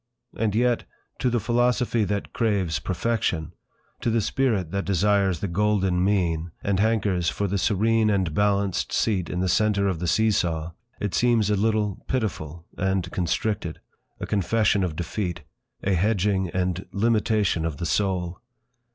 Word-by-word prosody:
And 105 Hz, -2 st, 0 dB
yet—to 125 Hz, +1 st, -1 dB
the 120 Hz, 0 st, +1 dB
philosophy 120 Hz, 0 st, +1 dB
that 100 Hz, 0 st, -3 dB
craves 100 Hz, -8 st, 0 dB
Perfection, 95 Hz, -5 st, -1 dB, 0.5 s
to -, -, -1 dB
the 115 Hz, 0 st, +2 dB
spirit 110 Hz, -7 st, 0 dB
that 100 Hz, 0 st, -1 dB
desires 100 Hz, -2 st, +2 dB
the 100 Hz, -, -1 dB
golden 95 Hz, -1 st, +1 dB
mean, 85 Hz, -4 st, +1 dB
and 100 Hz, -1 st, 0 dB
hankers 100 Hz, -5 st, +1 dB
for 100 Hz, -, -2 dB
the 100 Hz, +1 st, -1 dB
serene 110 Hz, +3 st, +2 dB
and 95 Hz, -6 st, +1 dB
balanced 100 Hz, 0 st, +1 dB
seat 95 Hz, -6 st, 0 dB
in 90 Hz, -, -2 dB
the 95 Hz, -, +1 dB
centre 105 Hz, 0 st, +2 dB
of 95 Hz, -4 st, -1 dB
the 90 Hz, -, -2 dB
see 110 Hz, +5 st, +3 dB
saw, 85 Hz, -4 st, -1 dB, 0.3 s
it 105 Hz, -2 st, -2 dB
seems 115 Hz, -4 st, +3 dB
a -, -, +3 dB
little 105 Hz, -1 st, 0 dB
pitiful, 85 Hz, -, -3 dB
and 95 Hz, -2 st, 0 dB
constricted; 90 Hz, 0 st, -2 dB, 0.4 s
a -, -, -3 dB
confession 105 Hz, 0 st, +1 dB
of 85 Hz, -4 st, -2 dB
defeat, 85 Hz, -1 st, -3 dB, 0.4 s
a 100 Hz, -, +1 dB
hedging 95 Hz, 0 st, +1 dB
and 90 Hz, +1 st, -2 dB
limitation 105 Hz, -4 st, +1 dB
of 80 Hz, -3 st, -2 dB
the 85 Hz, -, -3 dB
soul. 90 Hz, -1 st, -1 dB
100 Hz, 150 wpm, -25 LUFS, 90-110 Hz, 0.5 s, see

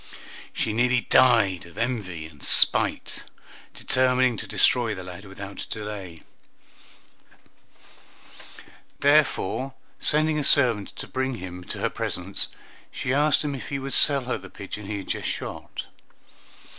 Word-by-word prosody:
She 110 Hz, -, -2 dB
nearly 125 Hz, +2 st, +2 dB
died 110 Hz, -11 st, +3 dB
of 85 Hz, -, -17 dB
envy 105 Hz, -9 st, -3 dB
and 75 Hz, -3 st, -15 dB
spite, -, -, +6 dB, 0.5 s
determining 130 Hz, -1 st, +2 dB
to -, -, -7 dB
destroy 120 Hz, -3 st, +2 dB
the 95 Hz, -, -8 dB
lad 90 Hz, +2 st, -10 dB
without 100 Hz, 0 st, -9 dB
delay; 100 Hz, -6 st, -7 dB, 2.8 s
therefore, 135 Hz, -3 st, +1 dB, 0.2 s
sending 155 Hz, 0 st, +2 dB
a -, -, -2 dB
servant 120 Hz, -8 st, +3 dB
to -, -, -7 dB
bring 130 Hz, 0 st, -3 dB
him 90 Hz, -3 st, -8 dB
to -, -, -6 dB
her -, -, +1 dB
presence, -, -, 0 dB, 0.4 s
she 125 Hz, -, -3 dB
asked 145 Hz, +1 st, +3 dB
him 145 Hz, -1 st, -3 dB
if 135 Hz, -, -7 dB
he 140 Hz, -, -3 dB
would 135 Hz, 0 st, -5 dB
sell 140 Hz, -3 st, +3 dB
her 125 Hz, -, -3 dB
the 95 Hz, -, -12 dB
pigeon 100 Hz, +1 st, -8 dB
he 105 Hz, 0 st, -4 dB
had 95 Hz, -, -8 dB
just -, -, -3 dB
shot. -, -, -6 dB
115 Hz, 135 wpm, -24 LUFS, 95-130 Hz, 2.8 s, spite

